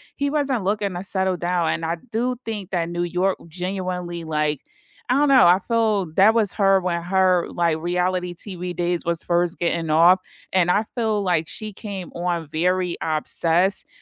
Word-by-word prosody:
he 285 0 -1
wasn't 280 -6 0
looking 200 0 -1
to 175 +1 -5
settle 190 -1 -1
down 175 -1 0
and 165 - -1
I 165 +1 -1
do 245 +3 -1
think 210 -4 -5
that 170 -3 0
New 175 0 -2
York 180 +2 0
genuinely, 180 -1 -4
like, 150 -2 -1 0.5
I - - +4
don't 290 +2 +3
know, 260 -8 +7
I 175 +1 +6
feel 215 0 +1
that 215 +4 +6
was 215 -4 +1
her 195 -2 +4
when 175 -2 -2
her 185 0 +2
like 170 -2 0
reality 180 +1 -1
TV 180 -1 -5
days 175 0 -1
was 170 -1 -2
first 175 +1 0
getting 170 -2 -1
off, 170 +4 +6 0.3
and 180 -2 +3
I 205 +4 +3
feel 220 -4 0
like 170 -4 +1
she 215 +8 -7
came 195 -3 -7
on 175 -2 -2
very 180 +3 0
obsessed 165 +4 0
180 Hz, 180 wpm, -22 LUFS, 170-200 Hz, 0.5 s, know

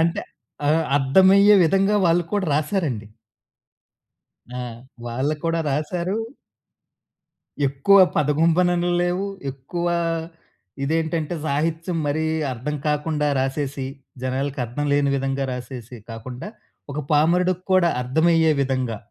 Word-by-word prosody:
అంటే, 165 +1 +1 0.5
ఆహ్, 160 +1 +3
అద్దమయ్యే 190 +9 +6
విధంగా 195 +4 +3
వాళ్ళు 170 +1 +3
కూడా 205 -3 0
రాశారండి. 145 - -1 1.5
ఆ! - - -5 0.5
వాళ్ళు 130 +6 -1
కూడా 165 0 +1
రాశారూ... 170 +6 -2 1.5
ఎక్కువ 140 +9 +4 0.2
పదగుంబననలు 170 +4 +2
లేవు. 175 +2 0 0.3
ఎక్కువా 170 +6 -2 0.9
ఇదేంటంటే, 160 +2 -1
సాహిత్యం 160 +4 -1
మరీ 155 +2 0 0.3
అర్థం 130 +5 -4
కాకుండా 150 0 0
రాసేసి, 135 0 -2 0.4
జనాలకి 130 +1 -2
అర్థం 135 +6 -4
లేని 145 -1 +2
విధంగా 135 0 -1
రాసేసి 125 -1 -7
కాకుండా, 120 - -7 0.4
ఒక 145 - -4
పామరుడుక్కూడా 180 +3 +3
అర్థమయ్యే 160 +5 +3
విధంగా, 130 -4 -1
155 Hz, 95 wpm, -22 LUFS, 135-175 Hz, 1.5 s, అద్దమయ్యే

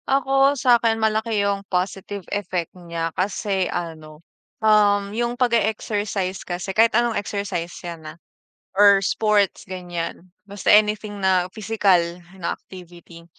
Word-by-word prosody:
Ako, 275 +1 +3
sa'kin 235 -3 +3
malaki 220 -1 0
yung 200 -1 0
positive 195 +1 -3
effect 185 -4 -3
niya 170 -2 -5
kasi 190 0 -1
ano, 160 -2 -6 0.3
um, 205 -2 +3
yung 240 +2 -2
pag 245 -2 +1
e-exercise 205 -3 -1
kasi 180 +2 -5
kahit 225 +2 +4
anong 240 -1 +2
exercise 200 -5 -3 0.2
yan, 165 -2 -7
ah, 155 - -12 0.6
or 200 -1 +7
sports 210 -2 +1
ganiyan, 175 -2 -5 0.2
basta 200 -1 -3
anything 210 -1 +2
na 185 -2 +3
physical 210 -4 +2 0.4
na 170 - -2
activity. 175 -2 -14
200 Hz, 125 wpm, -22 LUFS, 180-215 Hz, 0.6 s, or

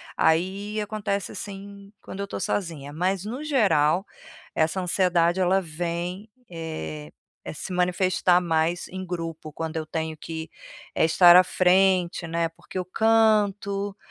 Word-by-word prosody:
aí 195 +6 +1
acontece 205 -1 -3
assim 200 0 -9
quando 190 - -9
eu 200 - -2
estou 200 - -6
sozinha. 155 -7 -3
Mas, 185 +3 -1
no 250 +7 -5
geral, 190 - +2 0.5
essa 160 +4 +1
ansiedade, 180 -1 +2
ela 185 +1 +3
vem, 175 +4 -4 0.2
eh, 80 - -6 0.4
se 180 - -6
manifestar 180 0 +2
mais 170 0 0
em 185 +1 -6
grupo, 165 -3 -5
quando 160 +1 -5
eu 160 - -3
tenho 160 -1 -3
que, 160 +1 -7 0.5
eh, - - +2
estar 175 +2 +7
à 185 - +9
frente, 185 -1 +2
né, 165 0 0
porque 170 +3 -11
eu 180 - -2
canto, 205 -1 +2
180 Hz, 135 wpm, -25 LUFS, 165-195 Hz, 0.5 s, à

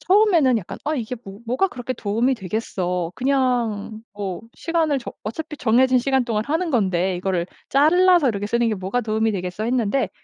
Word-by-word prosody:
처음에는 340 - +4
약간 185 - -8
'아 305 +2 0
이게 240 0 -3
뭐 195 +1 -10
뭐가 260 +11 +1
그렇게 250 -4 -5
도움이 230 +4 0
되겠어. 180 -4 -3
그냥 245 -5 0
뭐 195 -3 -4
시간을 325 -4 0
정 245 - -8
어차피 300 +8 -5
정해진 255 +2 +4
시간 265 0 +1
동안 220 -3 -1
하는 325 +3 0
건데 190 -6 +1
이거를 180 -1 -1 0.2
잘라서 340 +2 +5
이렇게 205 -2 -2
쓰는 235 +2 +1
게 220 - 0
뭐가 195 +6 -2
도움이 220 0 0
되겠어.' 180 +2 -4
했는데 245 +1 +1
235 Hz, 380 characters per minute, -22 LUFS, 205-275 Hz, 0.2 s, 잘라서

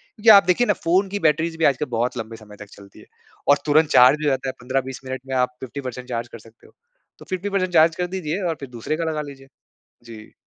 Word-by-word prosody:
क्योंकि 225 -1 +2
आप - - -5
देखिए 215 +7 +2
ना, 205 - +3
फ़ोन 185 +3 0
की 205 - -3
बैटरीज़ 160 +2 0
भी 165 - +1
आजकल 140 +1 +2
बहुत 125 +2 -1
लंबे 115 0 -6
समय 105 -2 -14
तक 105 - -11
चलती 100 -1 -16
है। - - -16 0.4
और 145 - +6
तुरंत 155 +1 +3
चार्ज 140 +3 +5
हो - - +3
जाता 135 -1 -2
है। - - -5
15-20 130 +1 -3
मिनट 130 0 -5
में 130 - -3
आप 125 0 0
50% 130 +2 -7
परसेंट 125 +1 -10
चार्ज 115 0 -3
कर 115 - -12
सकते 115 +1 -20
हो। - - -23 0.5
तो - - -13
50% 185 +2 -3
परसेंट 185 -2 -1
चार्ज 165 0 +5
कर 180 0 -2
दीजिए 180 0 -4
और 165 - -1
फिर 135 - -8
दूसरे 125 +5 -4
का 170 - -2
लगा 155 -1 -3
लीजिए। 135 -2 -11 0.6
जी। 110 -2 -12
140 Hz, 250 wpm, -22 LUFS, 125-165 Hz, 0.6 s, और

